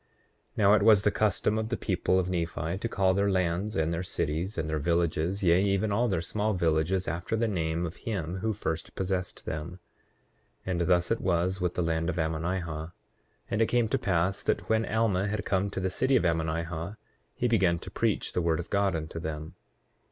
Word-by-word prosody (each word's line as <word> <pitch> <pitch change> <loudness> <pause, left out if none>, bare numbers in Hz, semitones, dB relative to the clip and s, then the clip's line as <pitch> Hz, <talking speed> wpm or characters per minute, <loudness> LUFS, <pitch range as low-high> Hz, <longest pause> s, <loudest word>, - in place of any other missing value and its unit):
8:7 - - -29
Now 100 -1 +5
it 105 - +4
was 105 -2 +6
the 105 - +3
custom 105 0 +1
of 110 0 -3
the 120 - -1
people 95 -1 +1
of 95 -1 +1
Nephi 85 0 -2
to 115 - -3
call 95 -3 +2
their 100 +1 +2
lands, 95 +2 0
and 80 +1 +1
their 85 - -2
cities, 85 +2 -2
and 80 -2 -1
their 80 0 -1
villages, 85 +4 0
yea, 85 +1 +5
even 100 +1 +1
all 120 +4 +2
their 90 -6 0
small 105 +4 -1
villages, 85 +2 +1
after 85 +7 -2
the 115 +1 +1
name 85 -4 -1
of 85 +2 -6
him 95 -5 -3
who 110 +4 -1
first 80 -6 -4
possessed 95 -1 -3
them; 80 +4 -5 0.9
and 90 -2 -1
thus 90 +2 +2
it 115 - +1
was 90 +1 0
with 90 -1 -1
the 90 - 0
land 80 +1 0
of 85 - -2
Ammonihah. 85 +3 -1 0.2
8:8 85 - -12 0.6
And 105 - +1
it 115 - +4
came 120 -2 +2
to 135 - +1
pass 95 -2 0
that - - -1
when 110 0 +1
Alma 105 -3 +1
had 105 0 -3
come 100 -1 +1
to 100 - -4
the 95 0 -1
city 130 +7 +2
of - - +3
Ammonihah 80 +3 -1 0.4
he 125 - 0
began 95 -7 +3
to - - -9
preach - - 0
the 90 - +1
word 85 -1 +1
of 85 - -6
God 100 -2 +2
unto 80 +1 -4
them. 80 -1 -5
90 Hz, 210 wpm, -28 LUFS, 85-100 Hz, 0.9 s, was